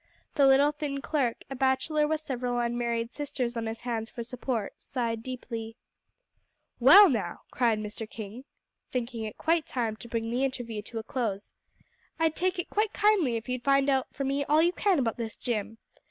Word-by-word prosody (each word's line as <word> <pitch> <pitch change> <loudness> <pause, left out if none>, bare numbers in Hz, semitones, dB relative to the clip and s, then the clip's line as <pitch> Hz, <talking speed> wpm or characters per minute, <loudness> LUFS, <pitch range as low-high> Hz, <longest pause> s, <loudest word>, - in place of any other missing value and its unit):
The 280 -2 +5
little, 275 +2 +6
thin 295 -2 -4
clerk, 275 -5 -1
a - - -3
bachelor 270 +4 +2
with 310 0 -1
several 250 -4 -2
unmarried 235 -1 -1
sisters 260 -4 -3
on 230 -1 -2
his 225 +1 -5
hands 230 -2 -3
for 235 - -6
support, 240 -2 -3
sighed 230 -3 -3
deeply. 230 -2 -6 1.0
"Well, 360 +12 +10
now," 210 - -2
cried 235 -3 +2
Mr. 215 +1 -6
King, 220 +4 -8 0.5
thinking 235 -2 -3
it 215 - -7
quite 325 -1 +1
time 230 -4 -1
to 235 - -10
bring 230 0 -2
the 250 +3 0
interview 245 -5 -3
to 225 +2 -8
a 220 - -3
close, 225 -7 -3 0.6
"I'd 320 -1 +1
take 370 +1 0
it 350 - -4
quite 425 +1 +1
kindly 405 - +3
if 230 +2 -4
you'd 250 -1 -3
find 275 +1 +4
out 265 -1 +1
for 275 - -4
me 275 +1 0
all 305 +3 +4
you 345 - +4
can 390 -2 +2
about 235 -5 0
this 225 -2 -4
Jim. 225 -2 -3
250 Hz, 185 wpm, -28 LUFS, 230-285 Hz, 1.0 s, Well